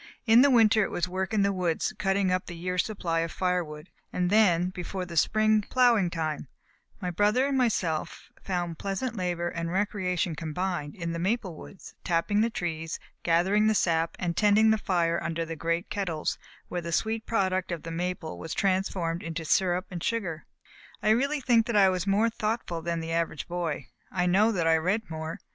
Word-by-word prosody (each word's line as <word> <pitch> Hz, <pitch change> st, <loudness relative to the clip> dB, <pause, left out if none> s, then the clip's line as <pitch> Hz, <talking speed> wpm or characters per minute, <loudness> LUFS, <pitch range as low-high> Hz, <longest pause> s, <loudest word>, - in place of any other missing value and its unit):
In 230 Hz, +1 st, +7 dB
the 285 Hz, -, +6 dB
winter 225 Hz, -4 st, +5 dB
it -, -, -2 dB
was 175 Hz, 0 st, -1 dB
work 190 Hz, +1 st, -3 dB
in 215 Hz, -2 st, +2 dB
the 200 Hz, 0 st, +2 dB
woods, 175 Hz, -3 st, -1 dB
cutting 195 Hz, -1 st, +1 dB
up 185 Hz, 0 st, -1 dB
the 175 Hz, -, -7 dB
year's 180 Hz, +1 st, 0 dB
supply 175 Hz, -6 st, -2 dB
of 165 Hz, 0 st, -2 dB
fire 180 Hz, -1 st, 0 dB
wood; 150 Hz, +2 st, -10 dB, 0.2 s
and 180 Hz, 0 st, 0 dB
then, 180 Hz, -5 st, +4 dB
before 185 Hz, 0 st, -5 dB
the 170 Hz, -1 st, -8 dB
spring 215 Hz, +5 st, +3 dB
ploughing 235 Hz, -4 st, +3 dB
time, 155 Hz, -3 st, -3 dB, 0.5 s
my 180 Hz, -3 st, -3 dB
brother 210 Hz, +8 st, +2 dB
and 280 Hz, -1 st, 0 dB
myself 195 Hz, -11 st, -1 dB
found 175 Hz, -4 st, -3 dB
pleasant 210 Hz, +5 st, -3 dB
labor 175 Hz, -3 st, -1 dB
and 165 Hz, 0 st, -3 dB
recreation 185 Hz, -3 st, 0 dB
combined 160 Hz, -1 st, -3 dB
in 170 Hz, -2 st, -4 dB
the 170 Hz, -, -3 dB
maple 190 Hz, -1 st, -1 dB
woods, 190 Hz, -, -12 dB
tapping 180 Hz, +5 st, +1 dB
the 230 Hz, -, +2 dB
trees, 165 Hz, -6 st, -4 dB, 0.2 s
gathering 190 Hz, +6 st, +3 dB
the 220 Hz, -, +3 dB
sap 165 Hz, -3 st, +1 dB
and 170 Hz, -2 st, -2 dB
tending 215 Hz, +2 st, +5 dB
the 220 Hz, -, +2 dB
fire 170 Hz, -4 st, +1 dB
under 165 Hz, 0 st, -2 dB
the 165 Hz, 0 st, -5 dB
great 170 Hz, +3 st, -2 dB
kettles 175 Hz, -7 st, -2 dB, 0.3 s
where 175 Hz, -, -3 dB
the 170 Hz, 0 st, -5 dB
sweet 220 Hz, +6 st, -1 dB
product 190 Hz, -4 st, 0 dB
of 170 Hz, -2 st, -4 dB
the 165 Hz, -, -6 dB
maple 175 Hz, -1 st, -4 dB
was 165 Hz, 0 st, -5 dB
transformed 185 Hz, -3 st, 0 dB
into 165 Hz, 0 st, -5 dB
syrup 180 Hz, +4 st, +2 dB
and 175 Hz, -2 st, -5 dB
sugar. 185 Hz, -9 st, -2 dB, 0.6 s
I 215 Hz, -, +4 dB
really 280 Hz, +6 st, +1 dB
think 235 Hz, -3 st, +3 dB
that 235 Hz, -, -1 dB
I 195 Hz, -2 st, +6 dB
was 185 Hz, 0 st, -2 dB
more 210 Hz, +4 st, +3 dB
thoughtful 215 Hz, -7 st, -2 dB
than 170 Hz, 0 st, -2 dB
the 165 Hz, 0 st, -4 dB
average 165 Hz, -3 st, -1 dB
boy. 170 Hz, -3 st, -3 dB, 0.3 s
I 180 Hz, -1 st, 0 dB
know 200 Hz, +5 st, +4 dB
that 175 Hz, -6 st, 0 dB
I 165 Hz, 0 st, +5 dB
read 190 Hz, +5 st, -1 dB
more. 160 Hz, +1 st, -5 dB
180 Hz, 195 wpm, -28 LUFS, 165-210 Hz, 0.6 s, In